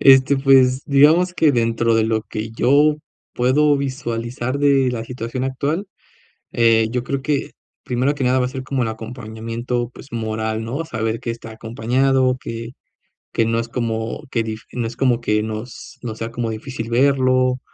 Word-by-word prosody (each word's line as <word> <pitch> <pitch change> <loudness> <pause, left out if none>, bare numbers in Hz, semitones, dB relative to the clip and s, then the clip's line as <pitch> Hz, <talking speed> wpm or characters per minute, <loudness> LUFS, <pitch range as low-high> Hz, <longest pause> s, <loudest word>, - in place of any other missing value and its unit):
Este, 135 +1 +6
pues, 135 -1 +4
digamos 155 +6 +5
que 155 -4 +4
dentro 115 -1 +1
de 110 -1 +3
lo 110 -1 0
que 110 0 -5
yo 145 +6 +3 0.4
puedo 145 +4 +3
visualizar 130 -1 -3
de 140 -3 +3
la 115 -2 -4
situación 125 +1 -4
actual, 145 +9 -2 0.7
eh, 115 -1 +4
yo 125 0 -1
creo 135 +1 -2
que 145 -1 -1 0.3
primero 125 +3 0
que 135 - -3
nada 130 +1 +3
va 125 - +2
a - - -1
ser 130 0 -6
como 130 -1 -1
el 110 - -1
acompañamiento, 115 +1 -4
pues, 140 - -13
moral, 110 -1 -2
¿no? 135 +8 -3
Saber 110 -5 -2
que 115 - -3
está 115 -1 -9
acompañado, 125 +4 +1
que 115 +1 -6 0.6
que 115 - +2
no 115 +1 0
es 115 - -5
como 115 +1 -3
que 115 - +1
dif 110 0 -5
no 120 -2 -2
es 115 +1 -6
como 125 -3 +2
que 105 -2 +1
nos 110 +3 -7
nos 110 -3 -5
sea 115 +1 -4
como 115 -1 -2
difícil 115 +1 -5
verlo, 130 0 +3
120 Hz, 175 wpm, -20 LUFS, 115-135 Hz, 0.7 s, Este